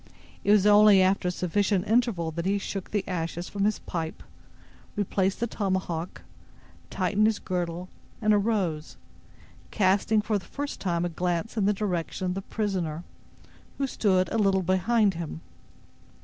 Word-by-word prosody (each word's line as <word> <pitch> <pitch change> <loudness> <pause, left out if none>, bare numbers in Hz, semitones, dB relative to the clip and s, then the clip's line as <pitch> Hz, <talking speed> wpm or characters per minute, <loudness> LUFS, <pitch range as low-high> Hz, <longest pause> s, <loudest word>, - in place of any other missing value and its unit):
It - - -1
was 205 -1 +5
only 210 -1 +7
after 190 0 +2
a - - +1
sufficient 185 +2 0
interval 220 -8 +1
that 170 +3 -3
he 200 +1 +2
shook 195 -1 -5
the 205 -2 -2
ashes 175 -1 -3
from 200 -1 -1
his 210 0 +1
pipe, 160 -2 -5 0.7
replaced 195 -1 0
the 235 - +1
tomahawk, 185 -6 -3 0.7
tightened 200 +3 +1
his 220 -2 +1
girdle, 175 -1 -3 0.3
and 215 -1 +3
arose, 200 -7 0 0.7
casting 205 +2 +2
for 210 0 0
the - - -15
first 285 0 -5
time 175 -2 0
a - - -1
glance 175 +5 -2
in 210 -4 +1
the - - +4
direction 190 -3 -2
of 180 - 0
the 195 - -4
prisoner, 185 -7 -3 0.7
who 275 - 0
stood 190 -7 +1
a 225 - 0
little 195 -2 +2
behind 195 +3 +2
him. 165 - -6
190 Hz, 155 wpm, -27 LUFS, 175-210 Hz, 0.7 s, only